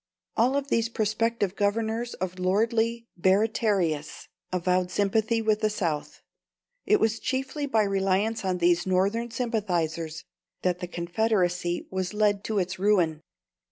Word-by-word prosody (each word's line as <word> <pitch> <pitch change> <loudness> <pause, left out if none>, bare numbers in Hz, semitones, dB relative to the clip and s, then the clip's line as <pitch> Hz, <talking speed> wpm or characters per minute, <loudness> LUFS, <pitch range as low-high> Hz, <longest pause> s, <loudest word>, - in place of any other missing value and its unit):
All 245 +4 +3
of 280 0 -3
these 230 -2 +1
prospective 215 -2 0
governors 220 +3 -1
of 185 0 -4
lordly 225 +5 +1
Baratarias 190 -5 +1 0.2
avowed 180 0 +1
sympathy 220 +4 +1
with 215 -1 +2
the 215 -1 +1
South. 170 -8 -3 0.6
It 420 - +4
was 225 0 +1
chiefly 270 +2 -2
by 225 -6 +3
reliance 195 +3 0
on 185 -1 0
these 175 0 +2
Northern 200 +6 +1
sympathisers 175 -9 -2 0.4
that 180 -1 +1
the 180 - -4
Confederacy 175 -1 0
was 190 +1 -3
led 205 -1 +2
to 220 - -1
its 185 0 -1
ruin. 180 -6 +2
205 Hz, 130 wpm, -27 LUFS, 180-225 Hz, 0.6 s, It